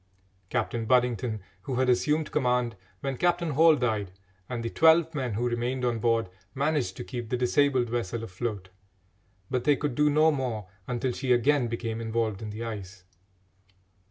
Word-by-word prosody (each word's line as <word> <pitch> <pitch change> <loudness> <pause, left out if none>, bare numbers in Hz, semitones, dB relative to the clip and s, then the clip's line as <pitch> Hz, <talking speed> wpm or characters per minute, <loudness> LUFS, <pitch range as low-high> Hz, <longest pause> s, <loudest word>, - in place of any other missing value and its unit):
Captain 115 -2 -1
Budington, 125 -3 +1 0.2
who 130 +6 -4
had 130 +1 +2
assumed 150 +5 +1
command 125 -4 +1 0.3
when 135 -2 -3
Captain 175 0 +1
Hall 160 +3 +6
died, 110 -7 -1 0.4
and 120 -2 -3
the 115 - -2
twelve 160 0 +5
men 130 -7 -2
who 120 +3 0
remained 120 +2 -1
on 120 -2 0
board, 115 -1 +1 0.3
managed 140 -9 0
to - - -5
keep 120 +4 -6
the 125 - 0
disabled 130 0 +2
vessel 115 -1 -3
afloat, 100 -2 -4 0.8
but 125 -2 0
they 145 -1 +4
could 145 -1 -2
do 150 +4 +3
no 155 +2 +4
more 120 -8 -3 0.2
until 125 +1 -1
she 130 +1 -2
again 125 +1 +3
became 115 -1 -3
involved 110 -2 -1
in 110 - -5
the 110 +2 -6
ice. 100 -4 -7
120 Hz, 165 wpm, -27 LUFS, 115-140 Hz, 0.8 s, Hall